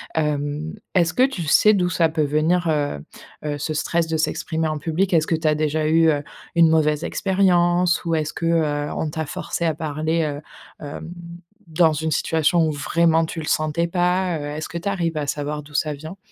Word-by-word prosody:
Hem, 150 0 -1 0.2
est-ce 170 -2 +3
que - - +1
tu 265 -11 -4
sais 210 +7 +5
d'où 180 -2 +1
ça 165 -2 +2
peut 155 -1 0
venir, 155 +4 +1
heu 145 - -1 0.5
heu, 145 -1 -2
ce 155 +2 -2
stress 165 +2 0
de 160 0 -1
s'exprimer 160 0 -1
en 155 0 -2
public? 175 +5 -1
Est-ce 160 -2 +3
que 165 - +1
tu 160 0 -2
as 155 - +4
déjà 155 0 0
eu, 165 +1 +4
heu, 145 -2 0 0.3
une 165 -1 +6
mauvaise 155 -1 +2
expérience 180 -2 +2
ou 165 -1 +1
est-ce 155 -1 -2
que, 170 - -4
heu, 150 -3 0
on 160 - -2
t'a 160 0 -3
forcé 170 - -4
à 160 - +2
parler, 155 +1 -1
heu, 145 -1 -3 0.4
hem, 155 +3 -7 0.6
dans 160 0 +3
une 160 +1 -2
situation 160 +2 +2
où - - 0
vraiment 165 +3 +2
tu 165 - -6
le 155 - -5
sentais 155 +2 0
pas? 180 0 +1
Heu, - - -6
est-ce 155 - -4
que 170 - -5
tu 200 - -2
arrives 170 -5 -1
à 145 -1 -2
savoir 150 +1 -3
d'où 145 +1 -16
ça 150 +1 0
vient? 155 +6 -9
160 Hz, 210 wpm, -22 LUFS, 150-170 Hz, 0.6 s, une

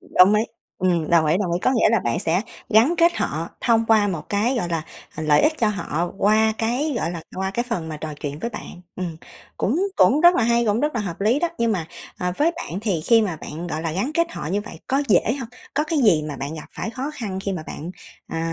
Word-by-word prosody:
Đồng 190 +3 +5
ý. 215 - +3 0.4
Ừm, 175 -4 +1
đồng 165 -2 +5
ý, 155 +4 +3
đồng 180 -4 -1
ý, 175 - +1
có - - +3
nghĩa 235 - +4
là 230 - +3
bạn 120 -6 -1
sẽ 170 +4 +1 0.3
gắn 230 +10 +5
kết 340 +1 +5
họ 160 +3 -2
thông 230 -1 +3
qua 215 -2 +4
một 170 -5 -4
cái, 225 +6 +1
gọi 175 -7 -1
là, 165 -2 -1 0.3
ờ, 155 - -4
lợi 150 -1 +4
ích 305 - +4
cho 220 - +3
họ 175 -4 -2
qua 220 +2 +4
cái, 250 +7 0
gọi 170 - -1
là, 170 -2 -6
qua 190 0 -1
cái 240 +5 -1
phần 170 -9 -2
mà 155 - -5
trò 155 0 -6
chuyện 145 0 -4
với 235 - -3
bạn. 180 -5 -9 0.2
Ừm, 175 -3 -4 0.4
cũng 275 - 0 0.2
cũng 295 - +5
rất 345 +1 +7
là - - +2
hay, 235 +1 +3
cũng 215 +2 +1
rất 295 -2 0
là 230 - 0
hợp 185 -3 -5
lý 225 +7 +3
đó, 345 - +1
nhưng 230 -1 +2
mà, 170 -6 -2 0.3
à, 180 0 -1
với 325 +4 +3
bạn 190 - -5
thì 200 -7 -1
khi 225 +7 +4
mà 180 -7 -2
bạn, 160 +3 -7
gọi 160 -1 -3
là, 165 -2 -2
gắn 200 - -1
kết 335 0 +1
họ - - -5
như 200 +5 0
vậy 205 -6 -10
có 275 +2 +1
dễ 210 +3 +4
hông? 230 - -6 0.3
Có 300 - +1
cái 315 -1 -1
gì 195 - +4
mà 145 - -5
bạn 140 +4 -5
gặp 155 - -8
phải 225 - -4
khó 265 +4 -4
khăn 200 -6 -4
khi 200 - -1
mà 165 -4 -4
bạn, 165 +4 -6 0.4
ờ, 165 - -4
205 Hz, 265 wpm, -22 LUFS, 165-235 Hz, 0.4 s, rất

